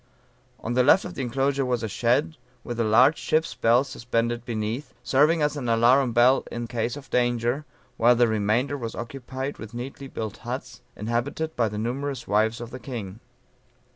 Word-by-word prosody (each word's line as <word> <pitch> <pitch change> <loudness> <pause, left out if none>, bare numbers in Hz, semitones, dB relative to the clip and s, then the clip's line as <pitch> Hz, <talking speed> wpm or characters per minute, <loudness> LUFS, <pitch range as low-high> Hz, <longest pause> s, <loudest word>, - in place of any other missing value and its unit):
On 115 - -3
the 125 - +4
left 145 +9 +5
of 180 - -6
the 145 - -5
enclosure 135 +2 0
was 125 -2 -1
a - - -1
shed, 120 +9 +1 0.3
with 120 -1 -5
a - - +3
large 125 +8 +5
ship's 160 +1 0
bell 120 +3 +3
suspended 120 -3 -2
beneath, 115 +4 -4
serving 150 +4 +3
as 150 0 +1
an 130 -5 -3
alarum 120 +3 +4
bell 120 +3 +4
in 120 0 -4
case 115 +2 -2
of 135 -3 -12
danger, 120 +3 +1 0.3
while 120 +2 +5
the 120 0 +4
remainder 110 +6 0
was 115 -2 -5
occupied 130 +3 -6
with 110 +1 -9
neatly 135 +3 -6
built 110 -5 -5
huts, - - -6
inhabited 120 +9 -2
by 115 -3 +1
the 105 - -6
numerous 135 +5 -3
wives 110 +2 +2
of 120 -1 -7
the 130 - -7
king. 115 -6 -7
120 Hz, 180 wpm, -25 LUFS, 115-135 Hz, 0.3 s, left